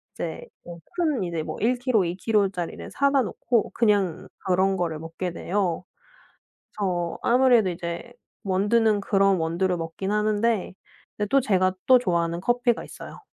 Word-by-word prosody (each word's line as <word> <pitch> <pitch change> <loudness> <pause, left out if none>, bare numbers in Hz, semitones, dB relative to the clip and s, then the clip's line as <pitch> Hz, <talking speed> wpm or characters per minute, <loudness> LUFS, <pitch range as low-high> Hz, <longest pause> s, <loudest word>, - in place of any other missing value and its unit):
이제 - - -5 0.2
뭐 170 -1 -10 0.2
큰 310 - 0
이제 170 -2 -3
뭐 - - -6
1 240 +4 +3
킬로, 240 -7 +2
2 170 +1 -2
킬로짜리를 195 -4 -1
사다 280 -1 +2
놓고 235 0 -1
그냥 205 -7 +1 0.2
그런 190 +1 +2
거를 165 -3 -2
먹게 165 +2 -5
돼요. 180 -1 -1 0.9
그래서 175 -4 -1
아무래도 245 -4 +4
이제 170 +6 -6 0.3
원두는 205 +2 +2
그런 195 -1 +3
원두를 170 +3 0
먹긴 165 +4 -4
하는데 210 0 +1 0.4
그런데 210 -1 -1
또 275 +3 +4
제가 185 -5 +2
또 255 - +8
좋아하는 170 -5 0
커피가 240 +1 +1
있어요. - - -11
195 Hz, 300 characters per minute, -25 LUFS, 175-230 Hz, 0.9 s, 또